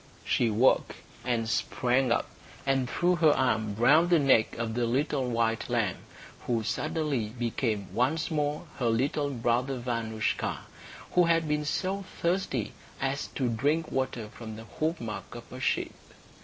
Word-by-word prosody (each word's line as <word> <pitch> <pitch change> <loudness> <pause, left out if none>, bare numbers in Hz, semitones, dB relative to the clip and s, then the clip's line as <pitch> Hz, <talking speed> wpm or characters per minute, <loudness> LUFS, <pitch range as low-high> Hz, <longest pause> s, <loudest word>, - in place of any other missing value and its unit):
She 120 - +2
woke, 115 +5 +3 0.3
and 120 -3 0
sprang 125 +3 +1
up, 120 - +2 0.4
and 135 -2 +1
threw 180 0 +2
her 160 -3 +5
arms 110 -5 +1
round 155 +9 +5
the 175 - +6
neck 135 -8 +3
of 115 -1 -2
the 120 0 0
little 130 +1 0
white 115 -1 0
lamb, 115 -6 0 0.5
who 115 -2 +1
suddenly 140 0 -1
became 115 -3 -1
once 155 +7 +1
more 150 -1 -1 0.2
her 120 -3 +2
little 140 +5 +1
brother 125 +1 0
Vanoushka, 115 -3 -2 0.5
who 180 -1 +5
had 165 -1 +2
been 150 0 0
so 195 +5 -1 0.2
thirsty 170 - 0 0.3
as 135 +1 -1
to 130 - 0
drink 145 +8 0
water 130 -4 -2
from 110 0 -8
the 110 - -9 0.2
hoofmark 155 -9 -3
of - - -10
a - - -7
sheep. - - 0
125 Hz, 150 wpm, -29 LUFS, 115-150 Hz, 0.5 s, the